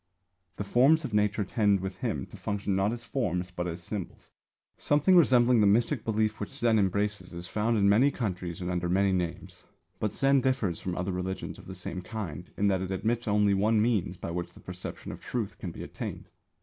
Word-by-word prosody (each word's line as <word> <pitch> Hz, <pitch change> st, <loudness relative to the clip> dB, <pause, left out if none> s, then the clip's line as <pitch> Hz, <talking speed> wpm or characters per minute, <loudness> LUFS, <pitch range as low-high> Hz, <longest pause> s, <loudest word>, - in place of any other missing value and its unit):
The 105 Hz, -, -3 dB
forms 140 Hz, +9 st, +4 dB
of 120 Hz, -, -5 dB
Nature 105 Hz, 0 st, +2 dB
tend 100 Hz, 0 st, +2 dB
with 95 Hz, +1 st, -5 dB
him -, -, -2 dB
to -, -, -10 dB
function 100 Hz, -1 st, -2 dB
not 95 Hz, +2 st, +2 dB
as 120 Hz, 0 st, -5 dB
forms 90 Hz, -9 st, -2 dB
but 90 Hz, 0 st, -3 dB
as 85 Hz, 0 st, -6 dB
symbols. 100 Hz, 0 st, -6 dB, 0.4 s
Something 150 Hz, +6 st, +3 dB
resembling 125 Hz, -7 st, +5 dB
the 105 Hz, -, +5 dB
mystic 115 Hz, +4 st, +2 dB
belief 110 Hz, -1 st, 0 dB
which 105 Hz, -, -4 dB
Zen 115 Hz, -2 st, +2 dB
embraces 100 Hz, -1 st, -1 dB
is 85 Hz, +1 st, -6 dB
found 110 Hz, +3 st, 0 dB
in 100 Hz, -1 st, +4 dB
many 115 Hz, +8 st, +5 dB
countries 90 Hz, -9 st, -4 dB
and 90 Hz, 0 st, -2 dB
under 90 Hz, -1 st, -1 dB
many 95 Hz, +2 st, +3 dB
names. 90 Hz, -3 st, -3 dB, 0.3 s
But 105 Hz, -, 0 dB
Zen 135 Hz, -1 st, +3 dB
differs 125 Hz, -10 st, 0 dB
from 90 Hz, -1 st, -4 dB
other 90 Hz, +2 st, -1 dB
religions 90 Hz, +1 st, -4 dB
of -, -, -14 dB
the 95 Hz, -, -7 dB
same 90 Hz, 0 st, -4 dB
kind 90 Hz, -5 st, -6 dB
in 100 Hz, -, +1 dB
that 95 Hz, -2 st, +1 dB
it 95 Hz, -, -3 dB
admits 110 Hz, +5 st, -1 dB
only 105 Hz, -1 st, +3 dB
one 105 Hz, +3 st, +3 dB
means 105 Hz, -5 st, +1 dB
by 85 Hz, -, -5 dB
which 85 Hz, 0 st, -4 dB
the -, -, -13 dB
perception 90 Hz, 0 st, -7 dB
of -, -, -9 dB
Truth 115 Hz, -5 st, -4 dB
can 90 Hz, -, -4 dB
be 85 Hz, -, -8 dB
attained. -, -, -7 dB
100 Hz, 210 wpm, -29 LUFS, 90-115 Hz, 0.4 s, resembling